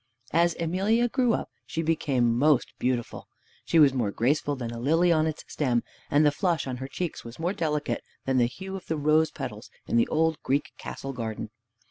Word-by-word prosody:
As 170 +1 +3
Emelia 195 +8 +2
grew 245 -1 +2
up - - -5 0.2
she 165 - -2
became 130 -7 +1
most 140 +1 +3
beautiful. 125 -2 -2 0.4
She 170 - +2
was 145 -4 +7
more 120 -6 0
graceful 140 +7 +1
than 120 -3 -5
a 115 - -6
lily 165 +7 +3
on 160 -1 +3
its 155 - -4
stem, 125 -5 0 0.3
and 145 +2 +4
the 150 - +5
flush 170 +1 0
on 130 -2 -4
her 130 +1 -5
cheeks 170 +4 -4
was 115 0 -10
more 175 +4 -1
delicate 150 -5 -1 0.2
than 130 -1 +1
the 120 -1 +4
hue 190 +10 -7
of 190 - -8
the 160 - -1
rose 155 +2 +3
petals 120 -7 -7 0.2
in - - 0
the 115 - +4
old 160 -1 +1
Greek 140 +2 0
castle 135 0 -6
garden. 110 -2 -5
150 Hz, 200 wpm, -27 LUFS, 125-165 Hz, 0.4 s, was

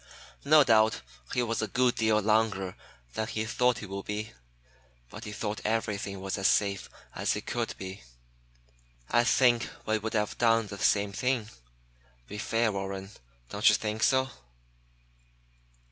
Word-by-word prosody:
No 150 +1 +7
doubt 110 -3 +4 0.3
he 125 - +1
was 115 -1 -1
a 110 - -1
good 125 +1 +2
deal 110 -3 +2
longer 105 -3 +1 0.4
than 110 - -2
he 110 -1 -2
thought 125 +1 +2
he 105 - -6
would 100 0 -6
be, 105 +1 -4 0.8
but - - -9
he 105 - -6
thought 105 0 -4
everything 105 -3 -2
was 95 +1 -3
as 95 - +3
safe 100 -2 +1 0.2
as - - 0
it - - -6
could - - -2
be. 95 +1 -7 1.1
I 120 - +4
think 120 -1 +3 0.2
we 110 0 +1
would 110 +1 -4
have 105 -1 -1
done 115 -1 +4
the 100 -1 -8
same 100 -1 +2
thing. 120 +1 -1 0.8
Be 105 - -7
fair, 115 +1 +1
Warren. 95 0 -5 0.4
Don't - - +4
you - - +5
think 110 0 -3
so?" 130 +1 +3
110 Hz, 155 wpm, -29 LUFS, 100-115 Hz, 1.1 s, No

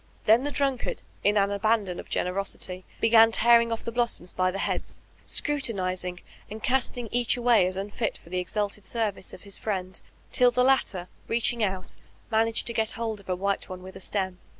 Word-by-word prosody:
Then 225 +4 +5
the 290 - -1
drunkard, 275 -3 -1 0.2
in 205 +1 +3
an 200 0 +3
abandon 200 -3 0
of - - -9
generosity, 185 0 -2
began 225 0 +6
tearing 235 +1 +5
off 225 - -3
the 230 - -3
blossoms 235 -7 -1
by 185 0 +1
the 190 - -4
heads, - - -2 0.3
scrutinizing, 185 -10 0 0.3
and 215 +1 -8
casting 250 -2 +1
each 245 +1 +2
away 235 -6 +4
as 185 - -3
unfit 205 +3 -3
for 170 - -17
the 180 0 -1
«alted 205 +2 -2
service 215 -5 -2
of - - -12
his 200 -1 -3
''friend," 190 -3 -3 0.3
till 250 0 +5
the 250 +1 +2
latter 230 -9 +2 0.2
reaching 235 0 +1
out 190 -2 -2 0.3
managed 225 +1 +2
to 235 - -2
get 220 -1 +1
hold 225 -2 -3
of 195 - -17
a 185 - +1
white 200 +2 -2
one 185 -1 -8
wid) 190 0 -10
a - - -8
stem. 190 -2 -2
210 Hz, 190 wpm, -27 LUFS, 185-235 Hz, 0.3 s, began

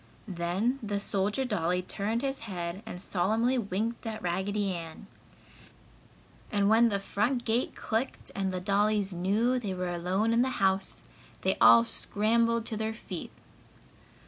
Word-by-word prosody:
Then 190 +8 -1
the 205 -2 -2
soldier 205 +5 0
dolly 180 -5 0
turned 215 +6 -2
his 270 0 -2
head 180 -3 -5
and 180 - -6
solemnly 220 +8 +1
winked 225 +3 -3
at 220 -1 -5
Raggedy 195 +3 -1
Ann. 165 +2 -7 1.5
And 200 -1 +2
when 230 +1 +6
the 200 -2 0
front 235 +5 -1
gate 230 +2 0
clicked 225 +4 -3
and 195 -1 -1
the 185 - -2
dollies 200 +1 +1
knew 210 +8 +1
they 200 -5 -4
were 180 -1 -2
alone 185 +6 0
in 235 - +4
the 260 - +2
house, 190 0 0 0.4
they 190 +1 +1
all 115 +1 +8
scrambled 230 - +1
to 220 - -3
their 220 0 -2
feet. - - -7
205 Hz, 145 wpm, -29 LUFS, 185-225 Hz, 1.5 s, all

